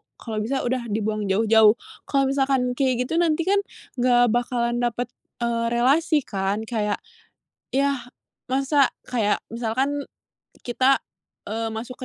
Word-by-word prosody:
kalau 220 -2 -5
bisa 265 +6 -1
udah 245 -1 -1
dibuang 215 -1 -1
jauh-jauh 215 +2 +5 0.3
kalau 275 -1 +2
misalkan 265 -2 +1
kayak 255 -3 +1
gitu 325 +6 -1
nanti 335 -1 +2
kan, 400 +4 +3 0.4
enggak 245 -1 +4
bakalan 240 0 0
dapet, 240 0 -1 0.3
eee, 235 0 0
relasi 290 +5 +3
kan 195 +1 -2
kayak, 215 -3 -2 0.7
iya, 275 -1 +2 0.5
masa 275 +1 +2 0.2
kayak 220 -5 +1
misalkan 255 +5 -1 0.6
kita, 260 +2 +2 0.5
eee, 225 +1 -2
masuk 235 +3 -6
245 Hz, 125 wpm, -24 LUFS, 225-270 Hz, 0.7 s, jauh-jauh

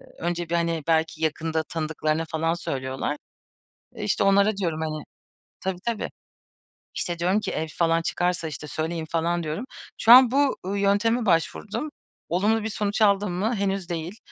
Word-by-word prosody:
Eee, - - -17
önce 175 0 -2
bir, 170 - -2
hani, 170 -2 0
belki 160 -1 +1
yakında 160 +1 0
tanıdıklarına 155 0 -2
falan 165 +1 0
söylüyorlar. 135 -2 -3 0.8
Eee, - - -6
işte, 105 - +1
onlara 200 +1 +4
diyorum, 165 -5 -1
hani 155 -1 -3 0.6
Tabii, 190 -2 -3
tabii. 230 -3 -2 0.9
İşte, 175 -1 -3
diyorum 185 +5 +2
ki, 215 - -3
"Ev 160 - -2
falan 165 0 +1
çıkarsa, 175 -1 -1
işte, 150 0 -7
söyleyin." 160 +2 -3
falan 170 +1 0
diyorum. 160 +9 -3 0.3
Şu 230 - +6
an 255 -1 +10
bu, 280 0 +2
ııı, 200 +1 -1
yönteme 215 +4 +2
başvurdum. 205 - 0 0.4
Olumlu 210 +6 +2
bir 220 - -2
sonuç 205 +1 -1
aldım 200 -2 +3
mı? 215 +7 0
Henüz 195 -2 -1
değil. 170 +5 -4
175 Hz, 165 wpm, -25 LUFS, 160-200 Hz, 0.9 s, an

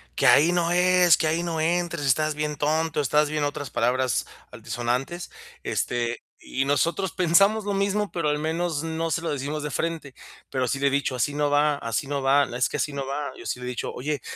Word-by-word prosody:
"Que - - 0
ahí 160 +4 +6
no 175 -1 +1
es, 180 -1 +5
que 160 - 0
ahí 165 +2 0
no 165 -2 -2
entres, 170 -2 0
estás 155 +3 +2
bien 150 0 -2
tonto, 155 +1 0
estás 150 +2 +2
bien" 150 -1 -1
otras 145 -1 -3
palabras 125 +2 0 0.3
antisonantes, 120 +8 -3 0.3
Este, 120 -1 -2 0.2
y 135 +1 -2
nosotros 165 +6 0
pensamos 195 +5 +3
lo 205 - -1
mismo, 200 +1 0
pero 165 -3 -1
al 150 0 0
menos 160 0 -1
no 165 0 -2
se 165 - 0
lo 165 - -3
decimos 145 +2 -3
de 150 - -3
frente. 160 -3 -3 0.3
Pero 130 -2 -1
sí 135 - -1
le 140 - +2
he - - +4
dicho: 140 -1 0
"Así 125 +4 0
no 145 -1 +1
va, 145 0 +3
así 115 +1 -3
no 140 -1 -2
va, 140 +1 +4
es 125 - +2
que - - -3
así 150 - -2
no 140 -1 -3
va". 140 +2 -3
Yo - - -11
sí - - -3
le 125 - -7
he - - -2
dicho: 125 - -4
"Oye, 145 +2 -3
150 Hz, 220 wpm, -25 LUFS, 135-165 Hz, 0.3 s, ahí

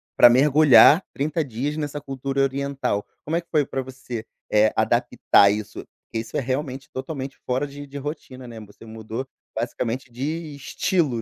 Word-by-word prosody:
pra 120 - +9
mergulhar 145 +5 +7
30 155 +3 -1
dias 135 +4 -3
nessa 145 -1 -3
cultura 135 0 -3
oriental, 135 -6 -1 0.2
como 160 +3 -1
é 170 - +1
que 170 - -29
foi 150 -2 +3
pra 135 -1 -3
você, 125 -3 -7 0.3
eh, 110 0 +4
adaptar 100 - +4
isso? 105 0 -3 0.3
Porque 115 - -4
isso 115 +1 -5
é - - +2
realmente 135 +1 -3
totalmente 135 0 -5
fora 130 +3 0
de 145 +1 -9
de 140 - -8
rotina, 135 -3 -7
né, 115 -2 -9
você 105 +1 -14
mudou 110 +3 -6 0.3
basicamente 120 +2 -3
de 150 +5 -4
estilo, 140 -2 0
135 Hz, 165 wpm, -23 LUFS, 120-145 Hz, 0.3 s, pra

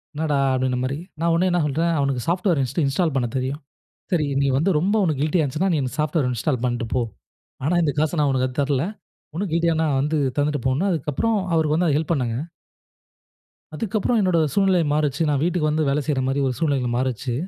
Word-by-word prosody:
என்னடா 150 -2 0 0.2
அப்படின்ற 130 -1 0
மாரி, 135 +2 -2 0.2
நான் 170 +1 +1
உடனே 175 +3 +2
என்ன 175 - +2
சொல்லுறேன் 165 +4 0
அவனுக்கு 140 -3 0
சாஃப்ட்வேர் 175 -3 +1
ஹிஸ்ட்ரி 135 +6 -1
இன்ஸ்டால் 160 +2 0
பண்ண 125 -3 +1
தெரியும். 130 +3 -2 0.5
சரி, 155 -4 +2 0.2
நீ - - +2
வந்து 160 +8 +2
ரொம்ப 190 +7 +1
உனக்கு 155 -6 0
கில்டியா 155 +2 +2
இருந்துச்சுன்னா 155 +7 0
நீ - - +1
இந்த 130 - -3
சாஃப்ட்வேர் 150 -3 +1
இன்ஸ்டால் 125 +2 -1
பண்ணிட்டு 120 -1 -1
போ. 125 - +2 0.6
ஆனா, 165 +5 +1
இந்த 150 -3 +1
காச 155 +2 0
நான் 145 -1 +2
உனக்கு 130 -1 +1
அதுக்கு 125 - -11
தரல. 140 -1 0 0.5
உனக்கு 185 0 -3
கில்டியாண்ணா 165 -1 +2
வந்து 150 +3 0 0.2
தந்துட்டு 145 -2 0
போன்னு, 135 +8 +1
அதுக்கப்புறம் 165 +8 0 0.2
அவருக்கு 155 -2 +2
வந்து 175 +1 +2
அது 145 - +2
ஹெல்ப் 160 +2 -2
பண்ணேங்க. 125 -6 -1 1.4
அதுக்கப்புறம் 220 +5 0
என்னோட 185 -4 +2
சூழ்நிலை 190 0 +3
மாறுச்சு. 150 0 0
நான் 140 -2 +1
வீட்டுக்கு 175 -3 +1
வந்து 155 -1 0
வேலை 140 +2 +1
செய்யற 145 -3 0
மாதிரி 135 +1 0
ஒரு 130 - -2
சூழ்நிலைகள் 135 -7 0
மாறிச்சு. 130 -1 -2
150 Hz, 195 wpm, -22 LUFS, 135-170 Hz, 1.4 s, சூழ்நிலை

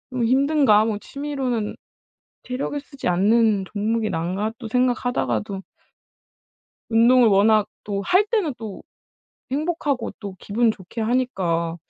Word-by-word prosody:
좀 250 -2 -1
힘든가. 265 -4 +4
뭐 215 -2 -1
취미로는 265 -4 -3 0.7
체력을 260 +3 -3
쓰지 275 -2 -6
않는 205 +3 +3
종목이 215 +1 -1
나은가.' 185 +6 -2
또 230 -4 -7
생각하다가도 245 -5 0 1.3
운동을 235 +2 +5
워낙 210 +1 +4 0.2
또 200 -1 -3
할 365 - +3
때는 395 - 0
또 215 -4 -8 0.7
행복하고 290 -3 -1
또 200 -3 -7
기분 225 +5 +1
좋게 210 +2 -7
하니까 190 -9 0
225 Hz, 255 characters per minute, -22 LUFS, 205-255 Hz, 1.3 s, 운동을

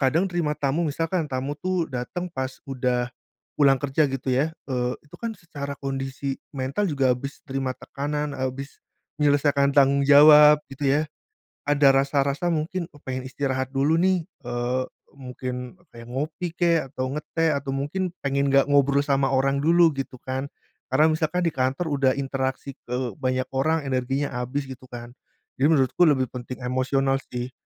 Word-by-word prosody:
kadang 150 +7 +2
terima 170 -4 -1
tamu, 150 +4 0
misalkan 165 +2 -1
tamu 135 +2 -3
tuh 185 -3 -1
dateng 155 +9 -4
pas 130 -2 -3 0.2
udah 125 -2 0 0.5
pulang 140 -2 +5
kerja 145 +2 +1
gitu 135 0 -3
ya, 145 +5 +1 0.2
eee, 125 -2 -1
itu 150 - -14
kan 230 -1 -3
secara 145 -5 -6
kondisi 135 0 -4
mental 140 +7 -2
juga 135 -4 +2
habis 140 +3 -7
terima 135 -1 -2
tekanan, 145 +1 -4
habis 130 +2 -5 0.4
menyelesaikan 145 -1 +3
tanggung 140 0 +4
jawab, 150 +1 +8
gitu 135 +1 -1
ya. 145 +2 +3 0.7
Ada 145 -1 +5
rasa-rasa 140 +3 +1
mungkin, 165 +3 -2
oh 145 - -17
pengen 130 0 -4
istirahat 130 -1 -2
dulu 140 +4 +2
nih, 185 0 +3 0.2
eee, 120 +1 -1 0.3
mungkin 125 0 -6 0.2
kayak 115 0 -12
ngopi 155 +6 -4
kek, 170 -5 +2
atau 130 -2 -3
ngeteh, 160 +2 -1
atau 140 -1 -2
mungkin 170 +7 -2
pengen 140 0 +1
nggak 135 0 +4
ngobrol 140 0 +4
sama 140 -1 +2
orang 135 +1 +2
dulu 170 +1 +5
gitu 135 -1 -5
kan. 130 +1 -3 0.4
Karena 150 +5 +4
misalkan 160 +3 0
di 165 - +1
kantor 135 +5 -1
udah 135 -2 +3
interaksi 135 0 -3
ke 125 -3 -3
banyak 130 0 -1
orang 155 +4 +1
energinya 135 +2 -1
abis 135 +3 -3
gitu 130 0 -10
kan. 120 -1 -9 0.5
Jadi, 140 - +4
menurutku 135 +1 +3
lebih 130 -4 +3
penting 125 0 -7
emosional 135 +2 +1
sih. 125 +1 -4
140 Hz, 160 wpm, -24 LUFS, 130-150 Hz, 0.7 s, jawab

